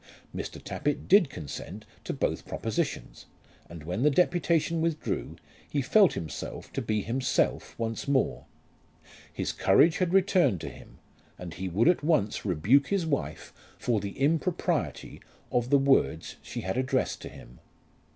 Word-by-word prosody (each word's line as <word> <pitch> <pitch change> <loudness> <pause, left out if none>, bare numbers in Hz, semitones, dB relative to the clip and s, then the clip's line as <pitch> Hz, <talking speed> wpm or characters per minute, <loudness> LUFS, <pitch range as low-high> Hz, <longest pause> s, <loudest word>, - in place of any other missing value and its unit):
Mr. - - -5
Tappitt 145 0 -3
did 195 -6 +6
consent 75 -6 -8 0.2
to - - -2
both - - -2
propositions, - - -3 0.4
and 85 -3 -9
when 90 +8 -3
the 150 - +5
deputation 170 +1 +2
withdrew, 165 -2 -2 0.3
he 145 - -1
felt 190 +8 +4
himself 80 -5 -6
to - - -2
be 105 -2 -1
himself 130 +3 -1
once 115 +2 -3
more. 135 -2 +1 0.9
His - - -2
courage 160 - +4
had 180 -2 +1
returned 185 - +3
to - - -5
him, - - -14 0.4
and 90 -2 -8
he 95 +2 -4
would 100 - +2
at 175 -4 +3
once 150 -10 +1
rebuke 105 - +3
his 195 -4 0
wife 145 -4 -3 0.2
for 115 -3 0
the 100 0 -6
impropriety 160 +5 -1 0.3
of 120 0 0
the 140 - +6
words 135 - +2
she - - -6
had 95 +5 -3
addressed 130 0 0
to - - -7
him. - - -14
135 Hz, 150 wpm, -28 LUFS, 100-165 Hz, 0.9 s, did